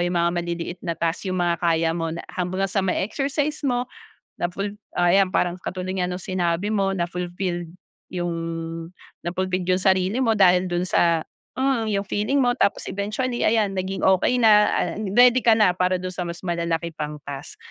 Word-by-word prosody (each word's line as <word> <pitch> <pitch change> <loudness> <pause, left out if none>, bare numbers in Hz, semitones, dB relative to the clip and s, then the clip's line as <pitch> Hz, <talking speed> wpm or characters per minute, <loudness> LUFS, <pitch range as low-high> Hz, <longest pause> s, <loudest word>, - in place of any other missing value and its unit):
'yung 175 0 0
mga 170 0 +2
maliliit 170 +1 -4
na 170 -3 -3
task 170 +3 -1
'yung 185 - -1
mga 175 -1 +1
kaya 165 -1 +2
mo 165 -1 -2
na - - -7
ham 180 -1 -1
ba 190 +1 -1
gang 190 - -3
sa 200 - +2
may 190 0 0
exercise 285 +5 -2
mo 245 -3 0 0.5
na - - +1
ful 195 +3 -2 0.3
oh - - -1
ayan 190 0 +4
parang 175 0 +1
katulad 185 0 -5
nga 180 - 0
nung 180 +1 -4
sinabi 180 +1 -1
mo 195 -2 +1
na 175 -2 -1
fulfilled 175 -1 -4 0.4
'yung 175 -1 -2 1.0
na-fulfilled 185 0 -1
yung 185 0 +2
sarili 190 +4 +2
mo 225 -3 +2
dahil 180 -1 +5
dun 175 +1 0
sa 170 -2 +2 0.3
uh 265 -3 +2
yung 200 -1 -1
feeling 215 +8 0
mo 245 -2 +3
tapos 220 - 0
eventually 215 +5 -2
ayan 215 -3 +2
naging 190 +1 -3
okey 190 +6 +3
na, 215 -3 +6
ah - - 0 0.2
ready 250 0 +6
ka 225 -2 +5
na 185 -5 +4
para 185 0 +1
dun 185 0 -5
sa 180 - -4
mas 170 0 -5
malalaki 170 -1 -1
pang 150 -1 -5
task. 140 +1 -8
185 Hz, 195 wpm, -23 LUFS, 175-205 Hz, 1.0 s, na